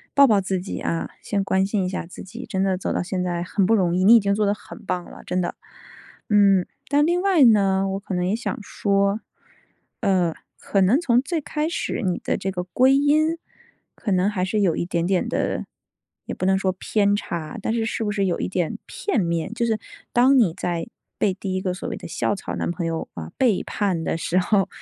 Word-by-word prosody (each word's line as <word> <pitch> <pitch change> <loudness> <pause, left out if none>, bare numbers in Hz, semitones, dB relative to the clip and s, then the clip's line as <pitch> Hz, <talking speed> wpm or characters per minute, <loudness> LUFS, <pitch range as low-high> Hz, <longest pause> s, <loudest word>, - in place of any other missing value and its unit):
抱 280 - +8
抱 210 -4 +4
自 190 0 -1
己 185 - -5
啊， 165 - -2
先 200 -2 -1
关 190 -1 +1
心 200 -1 0
一 - - -1
下 185 -2 -4
自 180 - -10
己， 185 - -9
真 190 0 -1
的 190 -1 +1
走 190 - -3
到 - - 0
现 180 0 -2
在 175 -1 -2
很 190 +2 0
不 225 - +4
容 180 -4 +2
易， 185 - +1
你 220 +5 +8
已 - - +8
经 200 -1 +1
做 210 +1 +1
得 200 - +2
很 210 - -12
棒 180 -1 -2
了， - - -12
真 185 - -1
的。 175 - -2 0.8
嗯， 200 -3 +5 0.2
但 290 +1 +4
另 350 +2 +1
外 380 -6 +4
呢， 195 -4 +4
我 195 0 -2
可 195 -1 -5
能 180 0 0
也 195 - +1
想 235 - -3
说， 200 +1 0 0.8
呃， 185 -6 +2 0.3
可 200 - 0
能 205 +10 +4
从 245 -6 +3
最 320 +5 -2
开 300 +2 -2
始 340 - -2
你 180 -2 0
的 - - 0
这 195 - -3
个 180 -1 -3
归 255 +9 +3
因 305 +3 +3 0.6
可 210 - -3
能 185 0 +3
还 195 -3 -2
是 210 +3 -1
有 175 -5 +2
一 - - -1
点 170 -1 -1
点 185 0 +1
地 - - -1 0.6
也 - - -5
不 - - -3
能 190 0 +3
说 190 -1 0
偏 200 +2 +1
差， 170 -2 -5
但 220 - -1
是 230 -1 0
是 225 - -2
不 210 - -1
是 200 -1 0
有 180 -3 0
一 - - -2
点 180 -3 -1
片 425 - -1
面？ 170 +3 -1
就 235 0 0
是 220 -2 0 0.3
当 260 +3 +5
你 210 -10 +4
在 175 -2 -2 0.3
被 200 - +2
第 190 0 -4
一 185 - -1
个 185 -1 -1
所 180 - -6
谓 - - -4
的 - - -10
校 - - 0
草 195 - -5
男 - - -2
朋 175 -1 -3
友， 165 -1 -3
呃， 80 -1 -7
背 235 -7 +2
叛 190 -6 -1
的 160 - -1
时 165 +2 -1
候， 195 +1 +2
195 Hz, 250 characters per minute, -23 LUFS, 180-225 Hz, 0.8 s, 抱